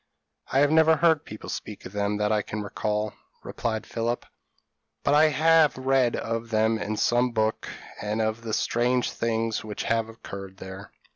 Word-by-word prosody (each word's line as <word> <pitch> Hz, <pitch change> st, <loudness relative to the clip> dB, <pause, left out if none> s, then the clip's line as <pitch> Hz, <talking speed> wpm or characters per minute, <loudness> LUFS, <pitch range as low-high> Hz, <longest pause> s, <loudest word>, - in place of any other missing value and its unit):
p> -, -, 0 dB
"I -, -, +5 dB
have 145 Hz, 0 st, +4 dB
never 160 Hz, 0 st, +6 dB
heard 160 Hz, -1 st, +3 dB
people 105 Hz, -, -9 dB
speak 105 Hz, -, -6 dB
of -, -, -7 dB
them, 105 Hz, 0 st, -1 dB
that 105 Hz, 0 st, +1 dB
I 105 Hz, -1 st, +2 dB
can 105 Hz, +1 st, -5 dB
recollect," 105 Hz, +1 st, -2 dB, 0.3 s
replied 110 Hz, -3 st, -3 dB
Philip; 120 Hz, +1 st, -2 dB, 0.8 s
"but 140 Hz, -, +2 dB
I 150 Hz, +1 st, +6 dB
have 155 Hz, 0 st, +4 dB
read 130 Hz, -2 st, +2 dB
of 115 Hz, 0 st, -3 dB
them 110 Hz, 0 st, +2 dB
in 105 Hz, +1 st, -3 dB
some 120 Hz, +2 st, +2 dB
book, 110 Hz, -1 st, 0 dB, 0.3 s
and 105 Hz, +1 st, -2 dB
of 110 Hz, +1 st, -1 dB
the 115 Hz, -1 st, -5 dB
strange 120 Hz, +3 st, +1 dB
things 115 Hz, -1 st, -1 dB
which 105 Hz, -1 st, -5 dB
have 115 Hz, -1 st, 0 dB
occurred 100 Hz, -4 st, -9 dB
there." 95 Hz, +1 st, -9 dB
115 Hz, 180 wpm, -26 LUFS, 105-125 Hz, 0.8 s, never